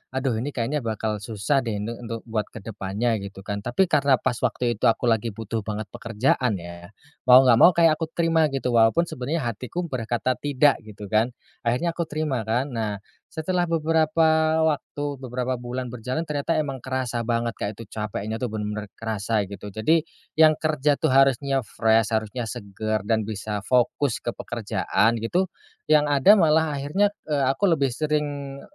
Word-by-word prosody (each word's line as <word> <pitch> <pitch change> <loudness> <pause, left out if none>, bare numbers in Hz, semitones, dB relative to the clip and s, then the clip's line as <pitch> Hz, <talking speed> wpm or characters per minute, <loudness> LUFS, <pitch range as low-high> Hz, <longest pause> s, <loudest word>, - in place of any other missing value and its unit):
aduh, 130 -4 0
ini 140 +4 -4
kayaknya 130 +5 -1
bakal 110 -2 -3
susah 105 +6 0
deh 115 -5 -3
nih 115 - -3
untuk 115 -1 -6
buat 110 -3 -3
ke - - -11
depannya, 110 +2 -2
gitu 100 -1 -9
kan, 100 0 -3
tapi 120 - +1
karena 140 -3 +4
pas 120 - -2
waktu 120 -2 -1
itu - - +3
aku 115 - +2
lagi 115 +1 +1
butuh 115 0 -3
banget 105 0 -3
pekerjaan 120 0 0
ya, 85 +2 -10 0.3
mau 130 +1 +9
nggak 120 -2 +5
mau 175 - +7
kayak 165 -2 +4
aku 160 - -2
terima 165 -2 +3
gitu, 135 -3 -2
walaupun 115 +8 +4
sebenernya 145 0 -3
hatiku 125 - -5
berkata 120 +1 -1
tidak, 145 0 +3
gitu 105 -2 -11
kan. 115 +3 +2 0.3
Akhirnya 145 +9 +1
aku 165 -1 -3
terima, 145 -8 -2
kan. 125 +5 0
Nah, 105 -3 -3 0.2
setelah 175 +2 -1
beberapa 160 0 +2
waktu, 145 -1 -1 0.2
beberapa 125 -1 -3
bulan 125 0 -5
berjalan 125 +7 -3
ternyata 150 +1 -1
emang 135 -4 -2
kerasa 130 -2 -3
banget 115 0 0
Kak, 100 - -1
itu 115 - -9
capeknya 105 +1 -4
tuh 125 - -1
bener 105 -1 -4
kerasa 110 -1 -1
gitu. 100 +1 -8
Jadi 160 +9 +2 0.3
yang 155 -1 +7
kerja, 150 -2 +1
tuh, - - 0
harusnya 135 0 +3
fresh, 110 0 +2
harusnya 110 +2 -2
seger, 105 +1 -3
dan 110 0 0
bisa 105 -1 -4
fokus 125 0 +1
ke 120 - -1
pekerjaan, 115 0 0
gitu, 175 - 0 0.4
yang 150 -1 +5
ada 145 +9 +6
malah 160 -2 +3
akhirnya, 190 +9 +1 0.2
eee, 145 -3 +1
aku 200 +8 +1
lebih 140 -4 0
sering, 145 -1 -2
125 Hz, 170 wpm, -24 LUFS, 110-150 Hz, 0.4 s, mau